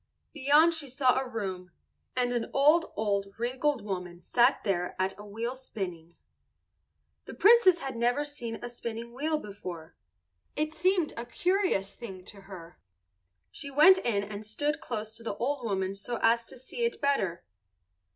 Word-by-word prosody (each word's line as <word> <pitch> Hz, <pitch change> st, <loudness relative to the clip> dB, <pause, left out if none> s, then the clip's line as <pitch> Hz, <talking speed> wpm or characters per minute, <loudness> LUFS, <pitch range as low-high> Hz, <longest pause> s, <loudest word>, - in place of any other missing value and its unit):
Beyond 300 Hz, +3 st, +5 dB
she 320 Hz, -3 st, -2 dB
saw 260 Hz, 0 st, +2 dB
a 265 Hz, -, -3 dB
room, 190 Hz, -5 st, -4 dB, 0.5 s
and 245 Hz, -1 st, +1 dB
an 235 Hz, -2 st, -2 dB
old, 300 Hz, +5 st, +4 dB
old, 200 Hz, -2 st, -1 dB
wrinkled 255 Hz, +1 st, -1 dB
woman 180 Hz, -3 st, -5 dB
sat 240 Hz, +7 st, +3 dB
there 180 Hz, -3 st, -1 dB
at 190 Hz, +1 st, 0 dB
a -, -, -8 dB
wheel 225 Hz, +4 st, -4 dB
spinning. 180 Hz, -10 st, -7 dB, 1.1 s
The -, -, -9 dB
Princess 410 Hz, -5 st, +6 dB
had 270 Hz, -2 st, -4 dB
never 245 Hz, +5 st, +1 dB
seen 245 Hz, -6 st, -5 dB
a -, -, -3 dB
spinning 235 Hz, -1 st, -6 dB
wheel 305 Hz, +5 st, 0 dB
before. 180 Hz, -, -8 dB, 0.6 s
It 305 Hz, +1 st, -1 dB
seemed 360 Hz, -2 st, +1 dB
a 235 Hz, +1 st, -6 dB
curious 360 Hz, -, 0 dB
thing 190 Hz, -6 st, -9 dB
to 200 Hz, -1 st, -11 dB
her. 180 Hz, -3 st, -11 dB, 0.7 s
She 285 Hz, -, -4 dB
went 310 Hz, +7 st, +7 dB
in 205 Hz, -, 0 dB
and 205 Hz, +1 st, -7 dB
stood 290 Hz, +8 st, -2 dB
close 220 Hz, -2 st, -5 dB
to 230 Hz, -, -11 dB
the 225 Hz, -, -3 dB
old 270 Hz, +1 st, -1 dB
woman 195 Hz, -3 st, -1 dB
so 205 Hz, +5 st, -5 dB
as 230 Hz, +1 st, +3 dB
to -, -, -10 dB
see 260 Hz, -, -5 dB
it 470 Hz, -, 0 dB
better. 205 Hz, -, 0 dB
235 Hz, 160 wpm, -29 LUFS, 200-290 Hz, 1.1 s, went